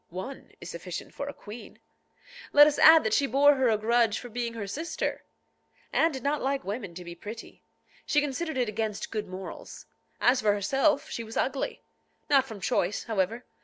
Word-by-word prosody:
One 190 +10 -7
is 175 - -8
sufficient 170 +1 -7
for 280 - -5
a - - -3
queen. 220 0 -11 0.8
Let 290 0 +9
us 295 -1 +1
add 320 0 +8
that 220 - 0
she 280 - +3
bore 280 +4 +5
her 260 -3 +2
a 220 - +3
grudge 225 0 +2
for 245 - -8
being 235 0 -3
her 215 -3 -4
sister. 310 - -3 0.7
Anne 330 - +3
did 265 -4 -6
not 290 +1 0
like 275 +1 -1
women 200 -4 -5
to 180 - -7
be 170 - -7
pretty. 210 +6 -10 0.5
She 295 - +3
considered 295 +1 -2
it 250 -2 +1
against 215 -1 -3
good 215 -2 -3
morals. 185 +1 -9 0.3
As 250 +1 +3
for 210 -1 +3
herself, 270 +9 +1
she 230 - -4
was 225 0 -7
ugly. 270 0 -2 0.5
Not 270 -2 +5
from 220 -5 -9
choice, 185 +1 0
however. 220 +2 -1
235 Hz, 190 wpm, -28 LUFS, 205-275 Hz, 0.8 s, Let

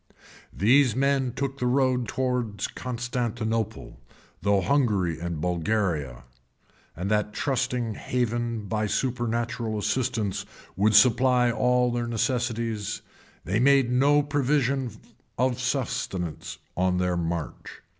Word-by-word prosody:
] - - -23
These 125 -1 +5
men 135 -1 +1
took 135 +2 -4
the 125 - 0
road 130 -1 +2
towards 125 -5 -1
Constantinople, 115 - -3 0.4
through 100 0 +2
Hungary 105 - +1
and 85 -2 -4
Bulgaria; 85 - -1 0.7
and 95 +5 -1 0.2
trusting 125 -2 -1
that - - -10
Heaven, 120 -2 -1
by 110 +1 -1
supernatural 120 -2 -1
assistance, 115 -3 -1 0.3
would 105 +3 +3
supply 125 +2 +5
all 125 +1 +2
their 120 0 -2
necessities, 115 -3 -1 0.4
they 100 +5 0
made 135 -1 +4
no 145 +3 +4
provision 140 -2 +1 0.5
for 130 +1 +2
subsistence 120 - -3 0.2
on 90 0 +1
their 90 0 +1
march. 85 -2 -4
120 Hz, 110 wpm, -26 LUFS, 105-130 Hz, 0.7 s, These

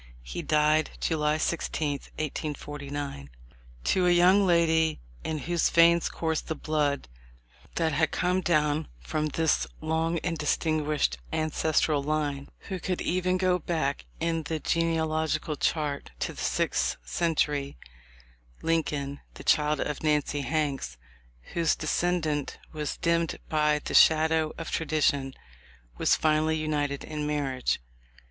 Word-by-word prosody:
He - - -5
died 155 0 +3
July 150 -1 +1
16, 155 -2 -1 0.3
1849. 145 - -5 0.5
To 180 - +2
a - - +5
young 185 +3 +5
lady 160 -2 +3 0.2
in 160 - -2
whose 170 +2 +1
veins 170 0 +5
coursed 160 -1 -2
the 160 - -2
blood 150 - -1 0.7
that 160 -2 +1
had 155 +2 +2
come 180 +1 0
down 150 -3 +1
from 155 -1 -2
this 150 - +1
long 160 +1 0
and 170 -3 -2
dis 150 - +1
tinguished 150 - 0
ancestral 155 -1 +1
line, 145 -1 -2
who 190 -2 -5
could 180 +1 -2
even 185 +1 +1
go 185 -1 +2
back 155 -4 -2
in 165 0 0
the 155 +1 -3
genealogical 160 -1 0
chart 145 -1 -1
to - - -3
the - - -8
sixth - - 0
century, 145 - 0 0.9
Lin 165 0 +3
coln, 140 -2 -4 0.2
the - - -10
child 150 -1 +3
of 150 - -2
Nancy 150 -1 +1
Hanks, 140 - -2 0.6
whose 165 -2 +2
descent 160 -5 -1 0.2
was 150 -2 -3
dimmed 170 -1 +1
by 150 -1 +3
the - - -3
shadow 160 0 +5
of 165 - -6
tradition, 145 -4 +1 0.6
was - - +4
finally 155 0 +2
united 145 -2 -1
in 150 -1 -4
marriage. 140 -4 -1
155 Hz, 130 wpm, -28 LUFS, 145-165 Hz, 0.9 s, a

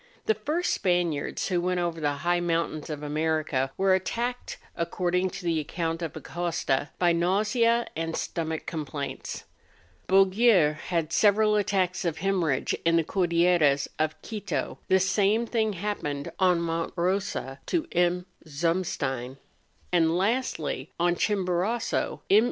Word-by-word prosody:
The 220 - +3
first 300 - -1
Spaniards 175 -5 0
who 180 -2 +1
went 180 0 0
over 170 -2 -2
the 145 -1 +1
high 175 0 +3
moun¬ 170 -1 0
tains 150 - -11
of 150 -1 -5
America 150 -3 0
were 190 0 +3
attacked, 240 +6 -2 0.2
according 180 +2 0
to 185 - -8
the 165 -2 +1
account 165 +2 -3
of 165 -3 -4
Acosta, 165 -5 -2
by 175 -1 +3
nausea 215 +7 +2
and 165 0 -2
stomach 160 -1 -3
com¬ 160 -2 -3
plaints. 140 0 -5 0.6
Bouguer 195 -3 +5
had 165 -2 -1
several 210 0 +4
attacks 190 -3 +1
of 165 -3 -1
hemor¬ 190 0 0
rhage 135 -3 0
in 165 0 +3
the 165 - +3
Cordilleras 170 -5 +2
of 155 0 0
Quito; 205 -6 -4
the 190 - +4
same 205 +4 +2
thing 220 -2 0
happened 170 -7 -3
on 180 -2 +4
Monte 165 0 -2
Eosa 175 -7 -1
to 335 -3 0
M. 175 +1 +1 0.2
Zumstein; 145 -5 -2 0.5
and 165 -1 +3
lastly, 190 - -1
on 175 0 +3
Chimborazo, 195 +3 0
MM. 200 - +6
175 Hz, 140 wpm, -27 LUFS, 160-195 Hz, 0.6 s, MM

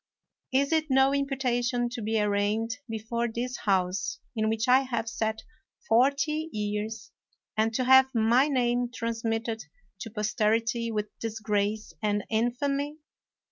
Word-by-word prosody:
Is 275 +2 +2
it 315 -1 +1
no 265 +1 +4
imputation 250 -3 0
to 240 -1 -6
be 220 +1 0
arraigned 210 +3 0
be 225 - -2
fore 235 +2 -2
this 240 +2 -3
House, 185 -2 +1 0.2
in 220 -1 +1
which 225 +2 -1
I 255 +1 +7
have 255 -4 -2
sat 220 0 -2 0.4
forty 285 +6 +2
years, 210 +1 -3 0.4
and 220 +1 +2
to 255 - +1
have 265 +1 +7
my 235 +5 +4
name 245 -3 +1
transmitted 225 -2 -2 0.3
to 225 - -6
posterity 225 +2 0
with 210 -1 -2
disgrace 215 -1 -2
and 205 -1 0
infamy? 275 +6 0
230 Hz, 135 wpm, -28 LUFS, 220-255 Hz, 0.4 s, I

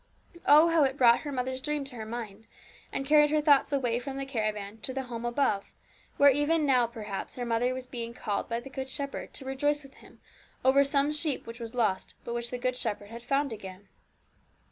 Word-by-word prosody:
Oh, 305 +3 +8
how 330 -2 +4
it 265 0 0
brought 240 -3 +6
her 295 - -6
mother's 260 0 -2
dream 300 0 -2
to 270 -2 -7
her 220 -2 -6
mind, 225 -2 -7 0.4
and 270 - -3
carried 295 +1 +5
her 305 +1 +2
thoughts 290 -2 +4
away 245 -4 +1
from 270 +2 -6
the 275 - -3
caravan 215 -4 -3
to 260 +4 -5
the 270 - -2
home 240 -2 -6
above, 240 -5 0 0.5
where 285 0 +7
even 295 +3 +2
now, 250 -4 +4
perhaps, 215 -4 -6
her 245 - -4
mother 235 +2 +1
was 255 0 -4
being 235 -2 -6
called 205 -4 -3
by 230 0 -1
the 240 - -10
Good 265 0 -5
Shepherd 280 +1 -4
to 270 - -7
rejoice 290 +2 0
with 275 0 -14
Him - - -17 0.5
over 275 +2 +6
some 280 +1 +1
sheep 300 -2 -1
which 230 +1 -9
was 230 +1 -7
lost, 215 -6 0
but 235 - -5
which 235 0 -2
the 250 - -4
Good 255 +1 -1
Shepherd 210 -3 -3
had 235 +1 -8
found 275 -1 0
again. 195 -1 -10
255 Hz, 215 wpm, -29 LUFS, 230-280 Hz, 0.5 s, Oh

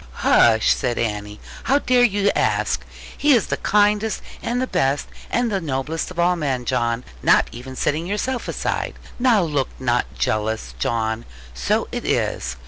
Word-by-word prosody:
'Hush!' 110 -1 +5
said 120 -2 -2
Annie: 105 -2 -3 0.3
'how 275 - +4
dare 255 -3 +3
you 205 -4 +3
ask? - - +1 0.3
He 295 0 +4
is 235 -6 +3
the - - -2
kindest, 210 +1 +2 0.2
and 245 +1 -1
the 255 - +1
best, 145 - 0 0.2
and 240 -2 0
the 195 -2 0
noblest 150 +1 -2
of 180 - -11
all 175 +1 +3
men, 135 -7 -2
John; 120 +1 0 0.2
not - - +4
even 125 +3 -9
setting 155 +6 -1
yourself 235 +6 -2
aside. - - -2 0.2
Now 240 -6 +4
look 145 -5 -1
not 125 -1 0
jealous, 110 - -1
John: 110 - -1 0.3
so 60 0 0
it - - -4
is. - - -1
145 Hz, 160 wpm, -22 LUFS, -, 0.3 s, Hush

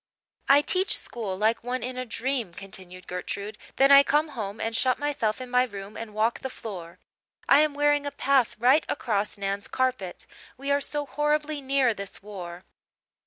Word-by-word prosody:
"I 285 +1 +7
teach 380 +5 +3
school 210 -6 -4
like 220 +3 +1
one 250 +1 -3
in 255 +1 -4
a 255 0 -4
dream," 235 -5 -2
continued 185 -2 -9
Gertrude; 200 +4 -5 0.2
"then 275 +1 +5
I 280 0 +10
come 300 +2 +2
home 220 -6 -5
and 225 0 -2
shut 255 +1 +2
myself 280 -7 -1
in 255 - -6
my 250 0 +3
room 205 -3 -7
and 220 -2 -7
walk 220 +2 +1
the 265 - -4
floor. 185 -9 -8 0.5
I - - +7
am 305 -2 +1
wearing 290 0 +2
a - - -3
path 275 -3 +2
right 255 +7 +4
across 210 -5 -1
Nan's 200 0 -3
carpet. 255 -8 -1 0.3
We 275 +2 -3
are 285 0 +3
so 295 +1 -2
horribly 295 +1 0
near 270 -3 +2
this 200 -1 -8
war." 180 -4 -8
245 Hz, 180 wpm, -26 LUFS, 205-280 Hz, 0.5 s, I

